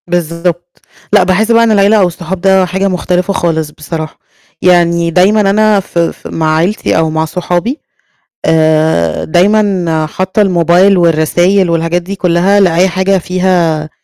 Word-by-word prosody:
بالضبط. 175 0 -4 0.3
لأ، - - +5
باحس 195 +5 0
بقى 230 0 +4
إن 230 - +2
العيلة 205 +1 +3
أو 190 -3 +3
الصحاب 175 +1 -6
ده 190 -1 +3
حاجة 190 +2 -2
مختلفة 180 +1 -2
خالص 160 -4 -2
بصراحة. 155 +1 -7 0.4
يعني 170 -1 +2
دايمًا 195 +6 +3
أنا 215 0 +2
ف 180 -2 -5
ف 170 - -3
مع 155 -1 -1
عيلتي 185 +7 -1
أو 160 -1 +1
مع 160 0 -1
صحابي، 180 - -3 0.7
آآ، 155 - +1
دايمًا 180 -3 +1
حاطّة 185 +6 -2
الموبايل 180 +1 +2
والرسايل، 175 +3 +1
والحاجات 165 +1 -1
دي 195 +3 -7
كلها 185 +2 +1
لأي 180 -1 +2
حاجة 190 +2 0
فيها 175 -4 -1
175 Hz, 145 wpm, -11 LUFS, 165-190 Hz, 0.7 s, لأ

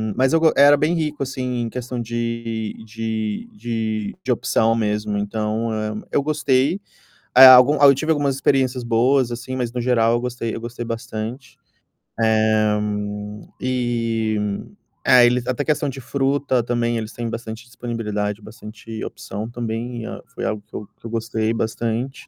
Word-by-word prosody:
mas 130 +3 +2
eu 165 - +5
go 160 -1 +5
era 145 +1 +7
bem 155 +4 +1
rico, 150 -3 -2
assim, 125 -2 -3
em 115 - -2
questão 125 0 -5
de 115 -1 -3
de 110 - -3
de - - 0
opção 115 0 +2
mesmo 105 -1 -1
então, 110 +2 -2
eh, 110 0 -2 0.2
eu 140 - +2
gostei, 150 +2 +1 0.6
aí 130 +1 +11
algum, 130 +3 +8
aí 140 - +8
eu 140 - +7
tive 155 +4 -2
algumas 140 -3 0
experiências 130 -2 +1
boas, 120 +2 +2
assim, 120 +2 -5
mas 120 -2 -2
no 125 - -3
geral 115 -2 +3
eu 120 - +1
gostei 120 -2 -3
eu 115 - -5
gostei 120 0 -6
bastante. 115 +2 -6 0.7
Eh, 110 -1 +3 0.8
E, 115 -3 0 0.7
eh, 125 -1 +7
eles 125 0 +1
até 130 +3 -1
questão 150 -1 +1
de 135 0 -7
fruta 135 0 0
também 120 -1 0
eles 110 0 -5
têm 120 -1 -4
bastante 115 0 -6
disponibilidade, 110 -4 -4
bastante 110 +1 -9
opção 110 +3 -6
também, 120 0 -4 0.3
foi - - -4
algo 105 -1 -2
que - - -14
eu 105 - -6
que - - -17
eu - - -9
gostei 115 -1 -1
bastante. 115 +3 -3
120 Hz, 160 wpm, -21 LUFS, 110-130 Hz, 0.8 s, aí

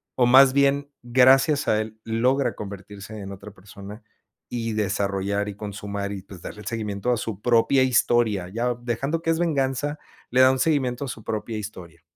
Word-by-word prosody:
o 125 - +3
más 130 +1 +7
bien, 140 +1 +2
gracias 130 +4 +4
a 110 - +2
él, 110 0 -8
logra 125 +5 +1
convertirse 100 +1 -9
en 100 -1 -7
otra 100 +2 -10
persona 100 +2 -12 0.5
y 115 -2 -3
desarrollar, 100 0 -1
y 100 - -7
consumar 100 -1 -5
y, 95 - -6
pues, 95 -2 -13
darle 105 - -8
el 100 - -11
seguimiento 110 0 -2
a 120 - +1
su 110 -3 -5
propia 120 +3 +3
historia. 115 -6 +2
Ya 120 +4 -1
dejando 135 +7 -2
que 165 - -2
es 165 0 +1
venganza, 145 -2 -1 0.3
le 125 - +1
da 130 0 +7
un 130 - -1
seguimiento 135 -5 0
a - - -6
su 110 - -7
propia 110 +1 -4
historia. 90 -6 -9
115 Hz, 185 wpm, -24 LUFS, 100-130 Hz, 0.5 s, más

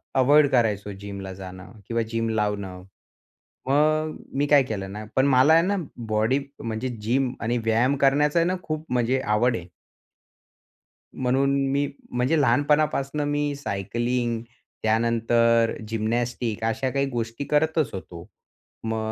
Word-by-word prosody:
Avoid 145 +3 +5
करायचो 105 -5 +1
जिमला 100 -2 -7
जाणं 95 0 -10 0.2
किंवा 115 0 0
जिम 115 0 -1
लावणं. 105 -4 -2 0.8
मग 155 +2 +2 0.2
मी 145 - +2
काय 145 -2 +6
केलं 100 -5 -5
ना 105 +2 -6
पण 130 - +4
मला 135 +3 +5
आहे 165 - +6
ना 200 +2 +1 0.3
बॉडी 110 +5 +1 0.2
म्हणजे 115 +3 -3
जिम 125 +4 0
आणि 120 +2 0
व्यायाम 115 +5 +2
करण्याचा 145 +4 +3
आहे 165 - +3
ना 185 - 0
खूप 155 0 -4
म्हणजे 125 +2 +1
आवड 115 +2 +2
आहे. 85 - -9 1.5
म्हणून 135 +2 +1 0.2
मी 140 +1 +1 0.2
म्हणजे 125 +6 +1
लहानपणापासून 145 0 +2
मी 145 0 -1
सायकलिंग 120 +1 -2 0.4
त्यानंतर 115 +1 +2
जिम्नॅस्टिक्स 115 0 -2
अशा 120 +4 -1
काही 140 0 +1
गोष्टी 115 +1 -3
करतच 155 -2 +1
होतो. 85 -3 -8 0.6
मग 110 0 -2
120 Hz, 130 wpm, -24 LUFS, 110-140 Hz, 1.5 s, काय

